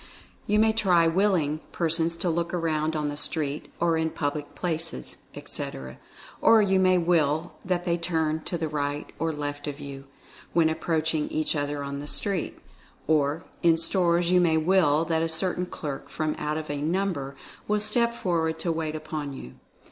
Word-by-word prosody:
You 210 - +3
may 220 +1 +4
try 185 -6 +4
"willing" 165 -4 +2
persons 165 0 +1
to 175 +1 -1
look 170 +1 -1
around 160 -2 0
on 150 -1 -1
the 145 - -4
street, 150 -1 -1
or 170 -1 +2
in 160 0 +1
public 145 -1 -3
places, 160 - -3 0.2
etc. 65 -1 -6 0.4
Or 225 - +7
you 195 -2 +3
may 185 -1 +5
"will" 165 -2 +1
that 180 -1 -1
they 170 0 +1
turn 160 -2 0
to 175 - -2
the 160 -1 -2
right 145 -1 -3
or 165 +1 0
left 145 -1 -4
of 145 0 -5
you, 140 -1 -8 0.5
when 165 -2 +4
approaching 160 -1 0
each 155 +1 0
other 145 0 -2
on 140 0 -4
the 145 - -6
street. 195 +1 -1 0.5
Or, 150 +1 +2 0.2
in 165 -1 +5
stores 170 0 +3
you 180 0 +5
may 165 -2 +3
"will" 160 -2 +3
that 160 0 +1
a 165 - 0
certain 180 +2 0
clerk, 145 -5 -6
from 155 -1 -1
out 150 +1 -1
of 155 -1 -4
a 145 -1 -3
number, 160 -4 -1 0.3
will 210 0 +2
step 235 +3 +1
for 175 -6 0
ward 160 0 -1
to 165 +1 -1
wait 160 -1 -2
upon 155 -2 -4
you. 65 - -9
160 Hz, 180 wpm, -26 LUFS, 150-175 Hz, 0.5 s, Or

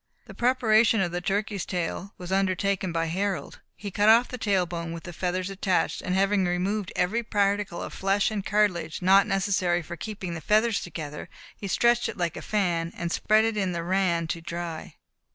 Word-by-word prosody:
The - - -11
preparation 230 -3 +3
of 180 -3 0
the 175 0 -3
turkey's 200 +1 -1
tail 180 +3 -4
was 180 0 -8
undertaken 190 -1 0
by 165 0 0
Harold. 190 +3 -3 0.2
He 200 -1 -7
cut 205 +3 +3
off 235 +3 +6
the 255 - -6
tail 195 -5 +2
bone, 170 -1 -5
with 170 - -7
the 175 - -8
feathers 185 +2 -2
attached, 190 -1 0
and 185 - -2
having 195 0 +2
removed 185 +3 -1
every 190 +7 +1
particle 205 -4 0
of - - -7
flesh 195 +2 +1
and 205 -2 -3
cartilage 185 -6 0
not 195 +2 +6
necessary 190 -3 +1
for 175 +2 -7
keeping 195 -2 -6
the 165 - -6
feathers 215 +5 +2
together, 150 -3 -7 0.3
he 200 - -6
stretched 240 +5 +2
it - - -7
like 170 -2 -1
a - - -6
fan, 175 -5 0
and 170 -1 -3
spread 215 +4 +3
it 225 -1 0
in 190 -3 0
the 170 -1 -3
ran 180 -2 +1
to 170 - -3
dry. 170 -1 -6
190 Hz, 195 wpm, -26 LUFS, 175-205 Hz, 0.3 s, off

